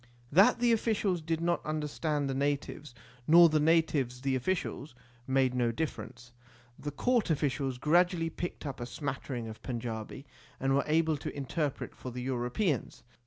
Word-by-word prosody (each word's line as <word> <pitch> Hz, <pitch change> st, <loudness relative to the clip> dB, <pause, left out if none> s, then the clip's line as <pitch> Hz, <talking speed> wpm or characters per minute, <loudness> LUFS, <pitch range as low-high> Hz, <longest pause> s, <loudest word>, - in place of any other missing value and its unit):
That 185 Hz, +7 st, +6 dB
the 240 Hz, 0 st, +3 dB
officials 210 Hz, -5 st, +1 dB
did 165 Hz, +1 st, -2 dB
not 170 Hz, 0 st, 0 dB
understand 150 Hz, -1 st, -2 dB
the 135 Hz, -, -1 dB
natives, 140 Hz, -1 st, -2 dB, 0.3 s
nor 170 Hz, +1 st, +8 dB
the 155 Hz, 0 st, +2 dB
natives 150 Hz, -6 st, +2 dB
the 135 Hz, 0 st, 0 dB
officials, 140 Hz, -2 st, -2 dB, 0.3 s
made 130 Hz, -1 st, +2 dB
no 120 Hz, -2 st, +1 dB
difference. 120 Hz, -4 st, -5 dB, 0.5 s
The 145 Hz, -, -4 dB
court 230 Hz, -, +1 dB
officials 140 Hz, -4 st, 0 dB
gradually 165 Hz, +3 st, +2 dB
picked 175 Hz, -2 st, -5 dB
up 140 Hz, -3 st, -5 dB
a 120 Hz, -, -4 dB
smattering 130 Hz, -3 st, -4 dB
of 110 Hz, 0 st, -9 dB
Panjabi, 115 Hz, +1 st, -5 dB, 0.3 s
and 135 Hz, 0 st, +1 dB
were 140 Hz, -, +3 dB
able 160 Hz, 0 st, +2 dB
to 145 Hz, -, -6 dB
interpret 140 Hz, +1 st, -3 dB
for 130 Hz, -, -8 dB
the 125 Hz, +1 st, -5 dB
Europeans. 130 Hz, -, -1 dB
145 Hz, 155 wpm, -30 LUFS, 130-165 Hz, 0.5 s, nor